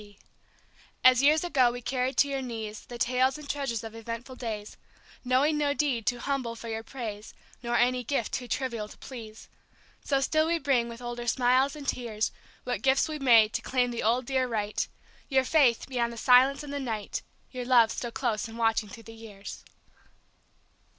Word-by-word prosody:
T. 205 Hz, -1 st, -16 dB, 0.9 s
As 255 Hz, -1 st, +7 dB
years 300 Hz, +3 st, +4 dB
ago 265 Hz, -8 st, +3 dB
we 245 Hz, -, -6 dB
carried 255 Hz, +2 st, -2 dB
to 285 Hz, -, +5 dB
your 275 Hz, -1 st, -2 dB
knees 220 Hz, -4 st, -6 dB
The 240 Hz, -, -7 dB
tales 255 Hz, +3 st, +2 dB
and 300 Hz, -1 st, -10 dB
treasures 270 Hz, -7 st, -2 dB
of 225 Hz, -1 st, -7 dB
eventful 230 Hz, +3 st, -7 dB
days, 215 Hz, -4 st, -5 dB, 0.5 s
Knowing 270 Hz, +5 st, +2 dB
no 285 Hz, -1 st, +1 dB
deed 265 Hz, -8 st, 0 dB
too 245 Hz, -, +2 dB
humble 255 Hz, -2 st, -2 dB
for 230 Hz, 0 st, -8 dB
your 220 Hz, 0 st, -3 dB
praise, 225 Hz, -3 st, -7 dB, 0.3 s
Nor 240 Hz, -1 st, -2 dB
any 250 Hz, +1 st, +2 dB
gift 240 Hz, -2 st, -1 dB
too 250 Hz, -, -3 dB
trivial 235 Hz, -3 st, -2 dB
to -, -, -14 dB
please, 225 Hz, -4 st, -10 dB, 0.6 s
So 275 Hz, -2 st, +1 dB
still 310 Hz, +3 st, +2 dB
we 335 Hz, +1 st, +2 dB
bring, 260 Hz, -6 st, +1 dB
with 235 Hz, +1 st, -9 dB
older 240 Hz, 0 st, -5 dB
smiles 255 Hz, +4 st, +3 dB
and 290 Hz, -2 st, -9 dB
tears, 225 Hz, -4 st, -1 dB, 0.3 s
What 250 Hz, 0 st, -3 dB
gifts 270 Hz, +3 st, +3 dB
we 310 Hz, -1 st, -5 dB
may, 235 Hz, -5 st, +6 dB
to -, -, -3 dB
claim 250 Hz, -1 st, 0 dB
the 235 Hz, -, -3 dB
old, 240 Hz, +3 st, +1 dB
dear 260 Hz, 0 st, 0 dB
right; 210 Hz, -3 st, -2 dB, 0.4 s
Your 265 Hz, -2 st, +3 dB
faith, 260 Hz, -5 st, +3 dB
beyond 240 Hz, -3 st, -1 dB
the 235 Hz, -, -9 dB
silence 260 Hz, +4 st, +5 dB
and 285 Hz, -1 st, -7 dB
the 285 Hz, -, -2 dB
night, 225 Hz, -6 st, -3 dB, 0.3 s
Your 250 Hz, -1 st, -5 dB
love 240 Hz, -3 st, +5 dB
still 240 Hz, -, -4 dB
close 230 Hz, -2 st, -2 dB
and 225 Hz, 0 st, -10 dB
watching 225 Hz, -2 st, +1 dB
through 230 Hz, +4 st, -11 dB
the 225 Hz, -, -11 dB
years. 215 Hz, -3 st, -10 dB
245 Hz, 190 wpm, -28 LUFS, 230-270 Hz, 0.9 s, As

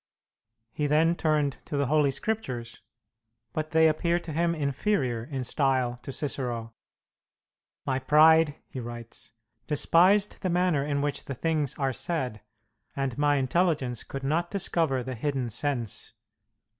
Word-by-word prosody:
He 150 Hz, +4 st, -1 dB
then 160 Hz, +3 st, +3 dB
turned 150 Hz, -4 st, +1 dB
to 145 Hz, -, -3 dB
the 140 Hz, -, +2 dB
Holy 150 Hz, +1 st, +3 dB
Scriptures, 130 Hz, -, -3 dB, 0.7 s
but 155 Hz, 0 st, -3 dB
they 160 Hz, 0 st, +5 dB
appeared 170 Hz, +2 st, +1 dB
to 160 Hz, -, -6 dB
him 170 Hz, +2 st, +1 dB
inferior 140 Hz, -, 0 dB
in 135 Hz, -2 st, -4 dB
style 130 Hz, -2 st, 0 dB
to -, -, -7 dB
Cicero. 120 Hz, -5 st, -3 dB, 1.1 s
"My 130 Hz, -1 st, 0 dB
pride," 155 Hz, +2 st, +5 dB
he 130 Hz, -, -7 dB
writes, 120 Hz, -1 st, -8 dB, 0.4 s
"despised 185 Hz, +7 st, +3 dB
the 185 Hz, -, -1 dB
manner 175 Hz, -5 st, +2 dB
in 145 Hz, -1 st, -1 dB
which 145 Hz, -1 st, -2 dB
the 140 Hz, -, -5 dB
things 155 Hz, -1 st, -1 dB
are 135 Hz, -2 st, 0 dB
said, 125 Hz, -6 st, -3 dB, 0.5 s
and 135 Hz, -3 st, -2 dB
my 145 Hz, 0 st, +3 dB
intelligence 135 Hz, -3 st, 0 dB
could 135 Hz, 0 st, -7 dB
not 165 Hz, +5 st, 0 dB
discover 165 Hz, -9 st, 0 dB
the 130 Hz, +1 st, -5 dB
hidden 130 Hz, -1 st, -2 dB
sense. 120 Hz, -5 st, -3 dB
145 Hz, 140 wpm, -27 LUFS, 130-160 Hz, 1.1 s, they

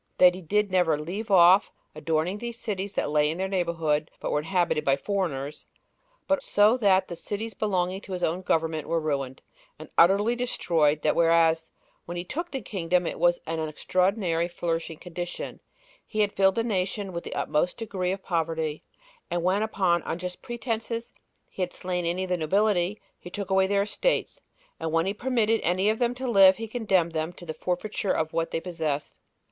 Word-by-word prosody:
That 180 Hz, -1 st, +7 dB
he 185 Hz, -, -8 dB
did 205 Hz, +4 st, 0 dB
never 175 Hz, -5 st, +3 dB
leave 195 Hz, +8 st, -5 dB
off 185 Hz, +1 st, +6 dB, 0.2 s
adorning 160 Hz, +5 st, -1 dB
these 235 Hz, 0 st, -5 dB
cities 200 Hz, -3 st, -4 dB
that -, -, -1 dB
lay 150 Hz, 0 st, +3 dB
in 160 Hz, -, -3 dB
their 190 Hz, +1 st, -1 dB
neighborhood, 165 Hz, -5 st, 0 dB
but -, -, -3 dB
were 150 Hz, -, +2 dB
inhabited 170 Hz, -1 st, 0 dB
by 135 Hz, -2 st, +3 dB
foreigners; 150 Hz, -5 st, -3 dB, 0.6 s
but 285 Hz, -, +2 dB
so 210 Hz, +3 st, +4 dB
that 195 Hz, -5 st, +3 dB
the 170 Hz, -, -6 dB
cities 215 Hz, +5 st, -5 dB
belonging 190 Hz, -2 st, -1 dB
to 195 Hz, -, -8 dB
his 180 Hz, -, -3 dB
own 170 Hz, +3 st, 0 dB
government 160 Hz, -3 st, 0 dB
were 165 Hz, +1 st, +1 dB
ruined, 140 Hz, -4 st, -3 dB, 0.3 s
and 155 Hz, -, -11 dB
utterly 200 Hz, +7 st, +5 dB
destroyed 160 Hz, -11 st, +1 dB
that 155 Hz, -, +2 dB
whereas, 165 Hz, -1 st, +3 dB, 0.4 s
when 175 Hz, +1 st, -6 dB
he 175 Hz, -, -3 dB
took 335 Hz, -, -4 dB
the 270 Hz, -4 st, -4 dB
kingdom, 180 Hz, -3 st, 0 dB
it -, -, -4 dB
was 175 Hz, 0 st, +3 dB
in 165 Hz, 0 st, -3 dB
an 155 Hz, -1 st, -2 dB
extraordinary 180 Hz, +1 st, 0 dB
flourishing 165 Hz, -2 st, -3 dB
condition, 175 Hz, +1 st, -6 dB, 0.5 s
he 215 Hz, -, -1 dB
had 205 Hz, -1 st, +1 dB
filled 195 Hz, -1 st, +3 dB
the 230 Hz, -, +1 dB
nation 195 Hz, -2 st, -2 dB
with 170 Hz, -, -4 dB
the -, -, -6 dB
utmost 165 Hz, +4 st, 0 dB
degree 190 Hz, -5 st, -2 dB
of 195 Hz, 0 st, -4 dB
poverty; 160 Hz, -3 st, -2 dB, 0.5 s
and 175 Hz, -1 st, -1 dB
when, 185 Hz, +3 st, +2 dB
upon 190 Hz, -5 st, +1 dB
unjust 180 Hz, +1 st, -4 dB
pretenses, 235 Hz, -1 st, -4 dB, 0.3 s
he -, -, -8 dB
had 180 Hz, -1 st, -1 dB
slain 180 Hz, -1 st, -3 dB
any 180 Hz, +2 st, -1 dB
of 185 Hz, -, -5 dB
the 180 Hz, -, +1 dB
nobility, 190 Hz, +3 st, +1 dB, 0.2 s
he 175 Hz, -, -10 dB
took 195 Hz, +1 st, -5 dB
away 190 Hz, 0 st, +4 dB
their 200 Hz, 0 st, +2 dB
estates; 355 Hz, -, -1 dB, 0.4 s
and 160 Hz, -, -3 dB
when 165 Hz, +1 st, +2 dB
he 195 Hz, -, 0 dB
permitted 225 Hz, -1 st, +1 dB
any 185 Hz, +4 st, +2 dB
of 220 Hz, -, -4 dB
them 245 Hz, 0 st, +1 dB
to 260 Hz, +1 st, -5 dB
live, 195 Hz, -5 st, +7 dB
he 225 Hz, 0 st, -5 dB
condemned 195 Hz, -7 st, +1 dB
them 160 Hz, +1 st, -2 dB
to 175 Hz, 0 st, -13 dB
the 160 Hz, -, -4 dB
forfeiture 190 Hz, +4 st, -2 dB
of 160 Hz, 0 st, -1 dB
what 165 Hz, 0 st, 0 dB
they -, -, -2 dB
possessed. 160 Hz, -5 st, -3 dB
180 Hz, 195 wpm, -26 LUFS, 165-205 Hz, 0.6 s, That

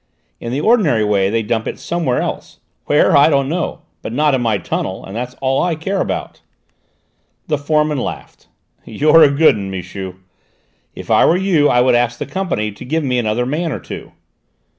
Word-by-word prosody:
In 115 Hz, -, -6 dB
the 135 Hz, +4 st, -1 dB
ordinary 185 Hz, -, +3 dB
way 100 Hz, -2 st, +1 dB
they 115 Hz, +2 st, 0 dB
dump 110 Hz, +1 st, -2 dB
it -, -, -4 dB
somewhere 165 Hz, -8 st, -1 dB
else: -, -, -6 dB, 0.3 s
where, 145 Hz, -, +3 dB
I 140 Hz, +2 st, +6 dB
don't 140 Hz, -3 st, +1 dB
know, 170 Hz, +3 st, -3 dB, 0.2 s
but -, -, -6 dB
not 150 Hz, +4 st, +2 dB
in 130 Hz, -, +1 dB
my 115 Hz, -3 st, +1 dB
tunnel, 95 Hz, -1 st, -4 dB
and 95 Hz, -, -9 dB
that's 125 Hz, +2 st, -5 dB
all 135 Hz, 0 st, +1 dB
I 175 Hz, -2 st, 0 dB
care 190 Hz, +5 st, -2 dB
about." -, -, -4 dB, 1.0 s
The 150 Hz, -3 st, -1 dB
foreman 150 Hz, 0 st, +1 dB
laughed. -, -, -7 dB, 0.4 s
"You're 155 Hz, +2 st, +4 dB
a 150 Hz, -, +7 dB
good 145 Hz, +3 st, +4 dB
'un, 100 Hz, -2 st, -5 dB
Michu! 95 Hz, 0 st, -6 dB, 0.8 s
If -, -, -7 dB
I -, -, +5 dB
were 170 Hz, -, +3 dB
you 180 Hz, -6 st, +2 dB
I 125 Hz, -, +3 dB
would 125 Hz, -, +3 dB
ask 120 Hz, 0 st, +1 dB
the -, -, -4 dB
Company 175 Hz, -, -2 dB
to 100 Hz, -, -11 dB
give 160 Hz, +5 st, -1 dB
me 125 Hz, -3 st, 0 dB
another 115 Hz, +1 st, -1 dB
man 155 Hz, +5 st, -2 dB
or -, -, -4 dB
two." -, -, -9 dB
135 Hz, 195 wpm, -17 LUFS, 115-155 Hz, 1.0 s, a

